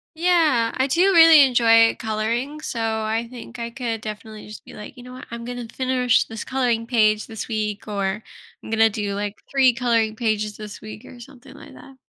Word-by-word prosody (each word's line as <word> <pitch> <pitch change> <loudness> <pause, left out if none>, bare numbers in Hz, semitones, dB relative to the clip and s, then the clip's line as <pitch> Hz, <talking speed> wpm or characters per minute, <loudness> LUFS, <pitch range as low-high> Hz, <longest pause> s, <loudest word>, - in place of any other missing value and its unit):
Yeah, 315 -9 +2
I 260 +1 +1
do 360 +8 +3
really 325 -3 +8
enjoy 230 -3 +4
coloring, 235 +6 -3
so 235 -6 -5
I 220 0 -2
think 245 -1 -10
I 235 0 -4
could, 235 -3 -4
definitely 215 0 -8
just 215 - -12
be - - -13
like, 210 +5 -11
"You 245 - -11
know 250 - -11
what? 255 - -10
I'm 235 0 -7
gonna 245 -1 -6
finish 255 -2 +1
this 225 -1 -7
coloring 245 -3 -1
page 215 -3 +1
this 220 -1 -7
week," 215 -2 -4
or 200 0 -2 0.4
"I'm - - -11
gonna 225 0 +3
do," 205 -1 -4
like, 205 +1 -5
"3 265 -2 +4
coloring 230 -2 0
pages 215 -3 -2
this 210 -1 -9
week," 215 +2 -10
or 245 - -13
something 270 +1 -15
like - - -14
that. 270 - -15
230 Hz, 200 wpm, -22 LUFS, 215-255 Hz, 0.4 s, really